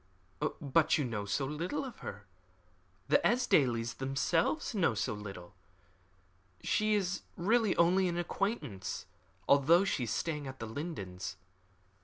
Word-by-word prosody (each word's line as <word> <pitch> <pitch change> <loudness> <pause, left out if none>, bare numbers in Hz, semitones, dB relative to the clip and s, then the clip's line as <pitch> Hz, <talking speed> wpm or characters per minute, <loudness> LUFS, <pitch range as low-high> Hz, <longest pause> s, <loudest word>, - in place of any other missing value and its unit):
"But 155 +1 +3
you 145 - 0
know 110 -4 -3
so 120 +7 0
little 170 - -3
of 255 - -9
her. 100 0 -7 0.8
The - - +5
Esdailes 125 - +2
themselves 145 - 0
know 170 - +2
so 105 0 -1
little. 100 -3 -8 1.1
She 215 0 +2
is 195 -2 -1 0.2
really 215 +3 +2
only 180 +2 +4
an 175 -1 -2
acquaintance, 170 - -3 0.4
although 160 +7 +5
she 135 -10 0
is 110 - -4
staying 150 +1 -2
at 130 0 -7
The 115 - -5
Lindens. 100 - -5
150 Hz, 130 wpm, -32 LUFS, 115-185 Hz, 1.1 s, The